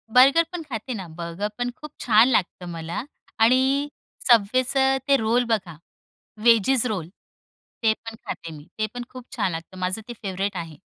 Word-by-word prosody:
बर्गरपण 330 Hz, +7 st, +5 dB
खाते 245 Hz, +1 st, -4 dB
ना. 190 Hz, -5 st, -6 dB
बर्गरपण 185 Hz, +8 st, -4 dB
खूप 300 Hz, -2 st, -10 dB
छान 225 Hz, +1 st, +5 dB
लागतं 185 Hz, -6 st, 0 dB
मला 165 Hz, +5 st, -4 dB, 0.4 s
आणि 260 Hz, +5 st, +4 dB, 0.4 s
Subwayचं 255 Hz, +5 st, +4 dB
ते 280 Hz, -, +6 dB
रोल 230 Hz, +2 st, +2 dB
बघा, 190 Hz, -7 st, -1 dB, 0.7 s
वेजीज 235 Hz, +2 st, +5 dB
रोल 185 Hz, -7 st, -3 dB, 0.8 s
ते 220 Hz, -1 st, +5 dB
पण 225 Hz, 0 st, -10 dB
खाते 165 Hz, -1 st, -6 dB
मी. 145 Hz, +2 st, -14 dB
ते 215 Hz, -, +1 dB
पण 245 Hz, 0 st, -5 dB
खूप 255 Hz, -2 st, -10 dB
छान 200 Hz, -6 st, 0 dB
लागतं 165 Hz, +3 st, -7 dB
माझं 185 Hz, +4 st, -1 dB
ते 240 Hz, -, -6 dB
फेव्हरेट 195 Hz, 0 st, -2 dB
आहे. 165 Hz, -3 st, -6 dB
220 Hz, 155 wpm, -24 LUFS, 185-255 Hz, 0.8 s, ते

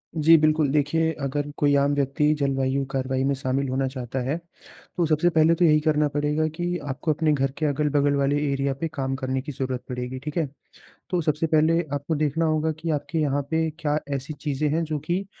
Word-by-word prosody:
जी, 160 Hz, +1 st, +6 dB
बिल्कुल। 155 Hz, -1 st, +3 dB
देखिए, 155 Hz, +3 st, +1 dB
अगर 145 Hz, +1 st, -2 dB
कोई 145 Hz, -1 st, +3 dB
आम 140 Hz, +1 st, +2 dB
व्यक्ति 145 Hz, +2 st, +2 dB
जलवायु 135 Hz, -1 st, 0 dB
कार्रवाई 130 Hz, -1 st, -1 dB
में 140 Hz, +1 st, +2 dB
शामिल 130 Hz, +1 st, -1 dB
होना 135 Hz, +1 st, 0 dB
चाहता 130 Hz, -1 st, -4 dB
है, 135 Hz, +6 st, -1 dB, 0.6 s
तो 175 Hz, -, +2 dB
सबसे 155 Hz, +2 st, +3 dB
पहले 160 Hz, 0 st, +4 dB
तो 175 Hz, +1 st, +3 dB
यही 155 Hz, -2 st, +5 dB
करना 150 Hz, -1 st, +2 dB
पड़ेगा 150 Hz, +2 st, +1 dB
कि 175 Hz, +1 st, -1 dB
आपको 145 Hz, +3 st, -1 dB
अपने 155 Hz, 0 st, +1 dB
घर 135 Hz, -2 st, 0 dB
के 155 Hz, -, -1 dB
अगल-बगल 145 Hz, 0 st, +1 dB
वाले 140 Hz, +1 st, +1 dB
एरिया 140 Hz, 0 st, 0 dB
पे 165 Hz, -, 0 dB
काम 135 Hz, -2 st, -2 dB
करने 130 Hz, -1 st, -2 dB
की 145 Hz, +3 st, -6 dB
ज़रूरत 130 Hz, -2 st, -3 dB
पड़ेगी। 125 Hz, +1 st, -4 dB
ठीक 150 Hz, +4 st, -6 dB
है? 160 Hz, -3 st, +1 dB, 0.6 s
तो 180 Hz, -2 st, 0 dB
सबसे 155 Hz, +1 st, 0 dB
पहले 160 Hz, +2 st, +3 dB
आपको 145 Hz, +3 st, -2 dB
देखना 155 Hz, +2 st, 0 dB
होगा 155 Hz, 0 st, +1 dB
कि 165 Hz, +1 st, -4 dB
आपके 160 Hz, +3 st, -4 dB
यहाँ 145 Hz, -2 st, +1 dB
पे 160 Hz, 0 st, +1 dB
क्या 150 Hz, -1 st, 0 dB, 0.2 s
ऐसी 135 Hz, +3 st, -5 dB
चीज़ें 150 Hz, 0 st, -1 dB
हैं 165 Hz, +1 st, +1 dB
जो 155 Hz, -2 st, -3 dB
कि 185 Hz, +3 st, -1 dB
145 Hz, 205 wpm, -24 LUFS, 135-155 Hz, 0.6 s, जी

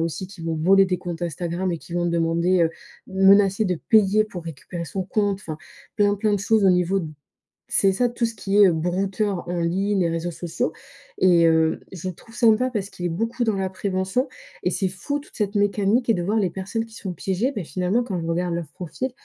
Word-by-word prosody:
aussi 170 Hz, +3 st, -4 dB
qui 195 Hz, -3 st, -13 dB
vont 165 Hz, -1 st, -2 dB
voler 195 Hz, +5 st, +5 dB
des 180 Hz, -1 st, -1 dB
comptes 175 Hz, -1 st, -6 dB
Instagram 175 Hz, +2 st, -2 dB
et 165 Hz, -, -3 dB
qui 170 Hz, -, -10 dB
vont 175 Hz, 0 st, 0 dB
demander, 170 Hz, +1 st, +2 dB
heu 160 Hz, -, 0 dB, 0.4 s
menacer 195 Hz, +2 st, +4 dB
de 180 Hz, -2 st, +1 dB
payer 215 Hz, -1 st, +5 dB
pour 180 Hz, -5 st, -8 dB
récupérer 170 Hz, +2 st, -6 dB
son 190 Hz, +3 st, -3 dB
compte. 200 Hz, 0 st, 0 dB
Enfin, 155 Hz, -4 st, -6 dB, 0.4 s
plein 205 Hz, -1 st, +3 dB
plein 210 Hz, +1 st, 0 dB
de -, -, 0 dB
choses 215 Hz, 0 st, +2 dB
au -, -, +7 dB
niveau 180 Hz, +2 st, +2 dB, 0.7 s
c'est 195 Hz, -1 st, +4 dB
ça, 245 Hz, +4 st, +1 dB
tout 240 Hz, -1 st, 0 dB
ce 225 Hz, -, -6 dB
qui 200 Hz, -1 st, -1 dB
est, -, -, +9 dB
heu, -, -, +3 dB
brouteurs 190 Hz, +3 st, -1 dB
en 175 Hz, 0 st, -2 dB
ligne, 195 Hz, +4 st, 0 dB
les 170 Hz, -, +2 dB
réseaux 165 Hz, +1 st, -2 dB
sociaux. 165 Hz, -2 st, -3 dB, 0.5 s
Et 175 Hz, -2 st, +5 dB
heu, 160 Hz, -1 st, +3 dB
je 185 Hz, 0 st, -5 dB
le 185 Hz, -, -5 dB
trouve 225 Hz, -, -17 dB
sympa 235 Hz, +1 st, +4 dB
parce 205 Hz, -5 st, -3 dB
qu'il 175 Hz, -, -5 dB
est -, -, +1 dB
beaucoup 230 Hz, +8 st, -1 dB
dans 220 Hz, -3 st, +1 dB
la 190 Hz, -1 st, -1 dB
prévention. 190 Hz, +6 st, -1 dB, 0.3 s
Et -, -, +1 dB
c'est 190 Hz, -3 st, 0 dB
fou, 240 Hz, +11 st, -3 dB
toute 290 Hz, -, -18 dB
cette 210 Hz, -1 st, -1 dB
mécanique, 205 Hz, +4 st, +2 dB
et 225 Hz, -, +5 dB
de 175 Hz, -, -2 dB
voir 205 Hz, +5 st, 0 dB
les 190 Hz, -4 st, +1 dB
personnes 195 Hz, +5 st, -3 dB
qui 225 Hz, -1 st, -16 dB
se -, -, -10 dB
font 185 Hz, -3 st, -4 dB
piéger. 195 Hz, -, -1 dB
Mais, 190 Hz, -, -2 dB
finalement, 185 Hz, +8 st, 0 dB
quand 190 Hz, -7 st, -3 dB
je 165 Hz, -, -4 dB
regarde 170 Hz, +1 st, -1 dB
leur 170 Hz, -3 st, -4 dB
profil, 185 Hz, +8 st, -4 dB
190 Hz, 230 wpm, -23 LUFS, 175-205 Hz, 0.7 s, est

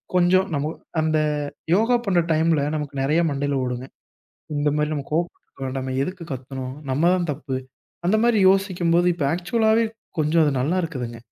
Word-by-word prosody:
கொஞ்சம் 185 Hz, +2 st, +4 dB
நம்மு 145 Hz, +1 st, -1 dB, 0.3 s
அந்த 155 Hz, 0 st, +2 dB, 0.6 s
யோகா 225 Hz, +5 st, +3 dB
பண்ணுற 180 Hz, -4 st, +3 dB
டைம்ல 160 Hz, -1 st, +3 dB
நமக்கு 150 Hz, -2 st, -4 dB
நெறையா 150 Hz, +5 st, +2 dB
மண்டையில 140 Hz, 0 st, -1 dB
ஓடுங்க, 125 Hz, 0 st, -3 dB, 0.7 s
"இந்த 145 Hz, 0 st, +1 dB
மாரி 150 Hz, 0 st, 0 dB
நம்ம 145 Hz, -2 st, -3 dB
கோவப்பட்டு 170 Hz, +2 st, -2 dB
இருக்க 135 Hz, -, -14 dB
வேண்டாமே. 130 Hz, 0 st, -3 dB
எதுக்கு 180 Hz, 0 st, -6 dB
கத்தனோம்? 130 Hz, 0 st, -6 dB, 0.2 s
நம்ம 155 Hz, +7 st, +3 dB
தான் 175 Hz, -2 st, -1 dB
தப்பு." 135 Hz, -2 st, -4 dB, 0.5 s
அந்த 200 Hz, +5 st, +4 dB
மாரி 235 Hz, -3 st, +3 dB
யோசிக்கும்போது, 180 Hz, -3 st, +2 dB
இப்போ 155 Hz, -5 st, -1 dB
ஆக்சுவலாவே 220 Hz, +5 st, +2 dB, 0.3 s
கொஞ்சம் 155 Hz, +2 st, +3 dB
அது 145 Hz, -, +2 dB
நல்லா 155 Hz, +8 st, 0 dB
இருக்குதுங்க, 125 Hz, -8 st, -5 dB
155 Hz, 160 wpm, -23 LUFS, 140-180 Hz, 0.7 s, கொஞ்சம்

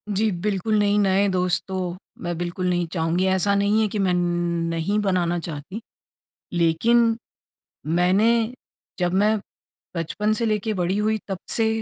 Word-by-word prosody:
जी 215 Hz, +3 st, +2 dB
बिल्कुल 200 Hz, +3 st, -1 dB
नहीं, 205 Hz, 0 st, +2 dB
नए 195 Hz, 0 st, +3 dB
दोस्त 180 Hz, -1 st, +1 dB
तो 185 Hz, -2 st, -3 dB, 0.3 s
मैं 175 Hz, -1 st, -3 dB
बिल्कुल 175 Hz, +1 st, -3 dB
नहीं 175 Hz, -1 st, +1 dB
चाहूँगी। 165 Hz, +2 st, 0 dB
ऐसा 190 Hz, +2 st, +2 dB
नहीं 205 Hz, +2 st, +2 dB
है 215 Hz, -, +2 dB
कि 210 Hz, -, -4 dB
मैं 190 Hz, -2 st, +2 dB
न -, -, +2 dB, 0.5 s
नहीं 165 Hz, +5 st, -1 dB
बनाना 180 Hz, -4 st, +1 dB
चाहती। 165 Hz, +6 st, -7 dB, 0.7 s
लेकिन 225 Hz, +8 st, +3 dB, 0.7 s
मैंने 180 Hz, +7 st, +3 dB, 0.7 s
जब 175 Hz, 0 st, +1 dB
मैं 210 Hz, +3 st, +3 dB, 0.6 s
बचपन 205 Hz, +6 st, -1 dB
से 230 Hz, +2 st, -1 dB
लेके 215 Hz, 0 st, 0 dB
बड़ी 185 Hz, 0 st, 0 dB
हुई 215 Hz, +1 st, +1 dB
तब 195 Hz, -3 st, -3 dB, 0.2 s
से 225 Hz, -1 st, +2 dB
190 Hz, 150 wpm, -23 LUFS, 175-210 Hz, 0.7 s, नए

